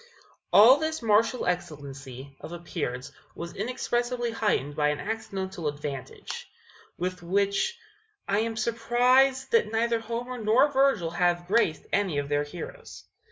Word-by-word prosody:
All 235 +7 +8
this 315 -3 -2
martial 225 +3 +3
excellency 140 -6 -5
of - - -8
appearance 150 -6 -4 0.2
was 170 0 -7
inexpressibly 240 +1 -1
heightened 205 -11 0
by 150 -1 +2
an 150 - -2
accidental 195 -5 -4
advantage, 145 -3 -6 0.5
with 180 0 -3
which 200 - 0 0.5
I 200 +1 +2
am 225 0 -2
surprised 250 +3 +3
that 460 - +3
neither 230 +1 +1
Homer 235 +2 -5
nor 245 +7 +4
Virgil 265 -12 +2
have 175 0 +1
graced 185 -5 +1
any 195 -7 +1
of 140 0 -2
their 145 0 +2
heroes. 315 - -9
200 Hz, 130 wpm, -27 LUFS, 165-240 Hz, 0.5 s, All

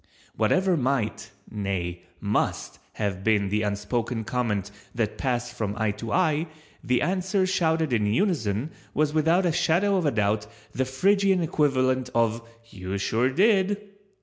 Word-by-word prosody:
—whatever 190 -1 +2
might—nay, 100 - -3 0.2
must - - -1
have 95 -3 -3
been 105 -2 +2
the 105 +2 0
unspoken 110 +3 -2
comment 105 -3 -2 0.2
that 115 -3 -1
passed 120 -2 -1
from 105 -4 -3
eye 110 -1 +1
to 110 +3 -6
eye, 160 -3 +2 0.4
the 125 0 +1
answer 190 +3 +1
shouted 160 -5 +1
in 105 -3 +2
unison, 135 - 0 0.2
was 150 0 +1
without 165 +4 +3
a 175 - +3
shadow 185 +5 +2
of 175 -5 +1
a - - +2
doubt 105 -1 0 0.2
the 130 - -1
Phrygian 190 +7 +2
equivalent 130 -5 +1
of 115 0 +2 0.3
"You 95 +1 -5
sure 115 +5 +1
did!" 200 - +3
125 Hz, 140 wpm, -26 LUFS, 105-165 Hz, 0.4 s, without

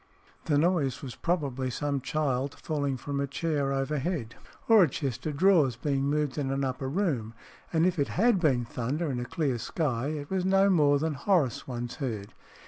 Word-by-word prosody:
The 150 -3 +2
noise 150 -5 +1
was 130 -3 -6
probably 140 -7 -1
some 140 +2 -2
child 135 -1 -1
falling 145 -4 -2
from 140 +2 -4
a 140 - 0
chair 140 -1 -1
overhead, 135 -2 -2 0.3
or 225 -2 +7
a 170 - +5
chest 135 0 -3
of 150 -2 -3
drawers 165 - +4
being 135 +2 -1
moved 150 0 0
in 135 -2 -1
an 135 +1 -1
upper 130 0 -2
room; 135 - -1 0.4
and 165 0 +3
if 180 -3 +1
it 140 - +2
had 225 0 +4
been 130 -8 +2
thunder 135 +7 -2
in 125 - -2
a 120 - -3
clear 130 -2 -1
sky, 130 -2 -1
it 150 0 -5
was 190 -1 0
no 195 +1 +4
more 145 -5 +4
than 155 +2 -1
Horace 145 - +1
once 120 -1 -5
heard. 110 -9 -4
145 Hz, 190 wpm, -28 LUFS, 130-160 Hz, 0.4 s, or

